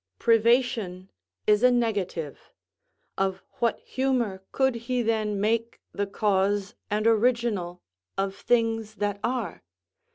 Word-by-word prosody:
Privation 225 -5 +2 0.3
is 210 0 +4
a 250 - +7
negative; 205 - -2 0.7
of 190 -1 0 0.2
what 235 -1 +1
humour 250 -7 -1
could 265 -1 +2 0.2
he 250 -1 +1
then 215 -2 0
make 230 +3 0
the 200 0 -2
cause 200 0 +1 0.2
and 210 +1 0
original 225 -6 +1 0.3
of 195 0 -1
things 225 -2 0
that 205 -1 -2
are? 235 -7 -2
215 Hz, 110 wpm, -26 LUFS, 195-235 Hz, 0.7 s, a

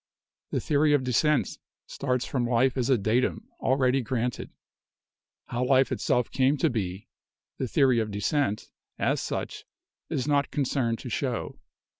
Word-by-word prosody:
The - - -1
theory 150 0 +2
of 145 -3 +3
descent 130 +3 +1 0.3
starts 125 -2 -2
from 125 -3 -1
life 125 +2 +3
as 125 -1 0
a 130 - +5
'datum' 120 - 0
already 130 0 +2
granted. 125 0 -2 1.0
How 120 +1 -2
life 130 +1 +3
itself 125 -1 0
came 135 +3 +2
to 150 +2 +2
be, 95 -4 -3 0.5
the 130 - -1
theory 130 -1 +3
of 110 -1 -1
descent, 105 +2 -1 0.3
as - - 0
such, - - -4 0.5
is 130 - -2
not 145 -1 +2
concerned 130 -4 0
to 125 - -6
show. 125 0 -3
130 Hz, 145 wpm, -27 LUFS, 120-140 Hz, 1.0 s, a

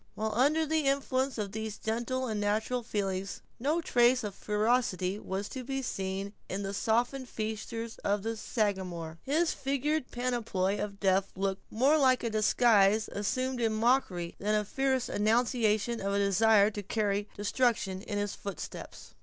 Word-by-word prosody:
While 220 0 -2
under 295 +7 +3
the 310 -2 +1
influence 275 -1 0
of 205 -3 -3
these 220 0 -4
gentle 240 +4 -2
and 215 -4 -2
natural 220 +4 0
feelings, 195 -4 -3 0.2
no 300 +7 +1
trace 245 -4 +3
of 205 -2 -4
ferocity 210 -3 0
was 195 0 -4
to 260 - -6
be 270 +1 -3
seen 195 -2 -3 0.2
in 195 +2 -3
the 195 0 -3
softened 245 +5 0
features 220 +1 -4
of 200 0 0
the 225 +1 -2
Sagamore. 185 -7 -2
His 315 +5 +1
figured 280 +1 -1
panoply 225 -6 -1
of 200 -1 -4
death 195 0 +2
looked 195 0 -3
more 275 +8 +4
like 260 -3 +4
a 230 - -1
disguise 215 -1 +4
assumed 255 +5 -1
in 225 -1 +2
mockery 215 -7 +1
than 210 +2 +1
a 210 0 +1
fierce 265 +2 0
annunciation 225 0 +1
of 200 0 -1
a - - +1
desire 200 +1 +4
to 205 - -5
carry 205 0 -1
destruction 205 -3 0
in 205 0 -4
his 205 -1 -1
footsteps. 200 -1 -8
220 Hz, 160 wpm, -30 LUFS, 200-250 Hz, 0.2 s, more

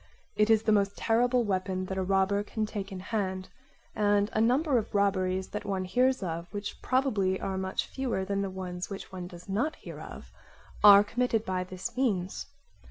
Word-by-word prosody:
It 210 +1 +3
is 220 -1 +5
the 220 - +2
most 200 -1 +2
terrible 245 +2 +2
weapon 185 -2 -1
that 190 +1 -4
a - - +1
robber 195 +1 +2
can 215 +1 -3
take 205 -2 -5
in 190 - -6
hand; 190 -2 -3 0.4
and 205 -1 +2
a 215 - +2
number 255 +3 +3
of 210 - -7
robberies 190 -2 +1
that 210 - -5
one 195 -2 -2
hears 255 +4 +2
of, 170 -1 -4
which 205 -1 -6
probably 215 -8 +1
are 190 - -3
much 190 0 -2
fewer 245 -8 -2
than 200 +1 -1
the 195 - -2
ones 180 -1 -5
which 195 -1 -7
one 180 -2 -6
does 175 -1 -12
not 230 +11 -1
hear - - -10
of, - - -10 0.5
are 205 -1 +10
committed 230 0 0
by 185 -1 -1
this 185 +1 -6
means. 200 -8 -1
200 Hz, 190 wpm, -29 LUFS, 185-220 Hz, 0.5 s, are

